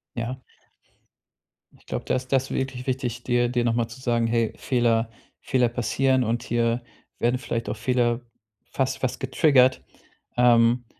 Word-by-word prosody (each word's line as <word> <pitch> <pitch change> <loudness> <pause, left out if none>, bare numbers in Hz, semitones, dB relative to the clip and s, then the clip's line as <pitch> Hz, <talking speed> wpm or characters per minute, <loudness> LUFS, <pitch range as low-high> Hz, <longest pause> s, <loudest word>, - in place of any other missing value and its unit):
Ja. 120 +2 -4 1.3
Ich - - -25
glaube, - - -4
das 130 - 0
ist 130 - -20
das 135 0 +1
wirklich 130 -1 -3
wichtig, 125 -2 -2
dir 120 -1 +1
dir 120 -1 0
nochmal 115 0 +1
zu 130 - -12
sagen: 120 -3 +1
„Hey, 115 -1 0
Fehler 120 -3 +1 0.3
Fehler 125 -3 +1
passieren 130 +2 +1
und 115 +1 -1
hier 120 0 0 0.4
werden 120 +2 +2
vielleicht 115 -4 -4
auch 105 - -3
Fehler 120 0 +1 0.5
fast 130 0 -1
fast 130 - -2
getriggert.“ 130 -1 +3 0.6
Ähm, 120 0 +4
120 Hz, 145 wpm, -24 LUFS, 115-130 Hz, 1.3 s, Ähm